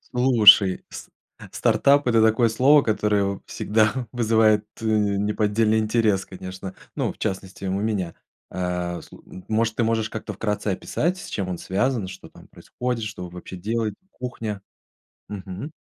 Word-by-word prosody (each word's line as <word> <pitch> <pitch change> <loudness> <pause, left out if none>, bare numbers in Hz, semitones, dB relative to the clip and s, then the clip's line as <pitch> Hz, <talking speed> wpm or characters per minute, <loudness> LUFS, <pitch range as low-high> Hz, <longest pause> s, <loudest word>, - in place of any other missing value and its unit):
Слушай, 110 -6 +6
с - - -9 0.4
стартап- 140 +1 +3
это 115 -2 +4
такое 110 +2 +4
слово, 135 +6 +5
которое 105 -2 +1
в 100 0 -3
всегда 110 0 +1 0.2
вызывает, 110 -3 +3 0.2
э, 115 - -6
неподдельный 105 +1 +1
интерес, 110 -3 +1
конечно. 95 0 -8 0.2
Ну, - - -1
в - - -26
частности, 95 0 -4
у 95 - -1
меня. 100 -6 -2 0.4
А, 90 -1 -3
слу - - -15
м 95 - -12
может, 110 0 0
ты 120 - +1
можешь 110 -1 0
как-то 110 -1 -5
вкратце 105 +1 -3
описать, 165 - -1
с - - -9
чем 95 -3 -3
он 90 - -3
связан, 105 +3 -1
что 95 0 -11
там - - -17
происходит, 125 -2 -4
что 105 -4 -6
вы 90 - -7
вообще 90 +1 -9
делаете, 110 +2 -2 0.2
кухня? 115 -5 -5 0.7
Мгм. 100 - -7
105 Hz, 155 wpm, -23 LUFS, 95-115 Hz, 0.7 s, Слушай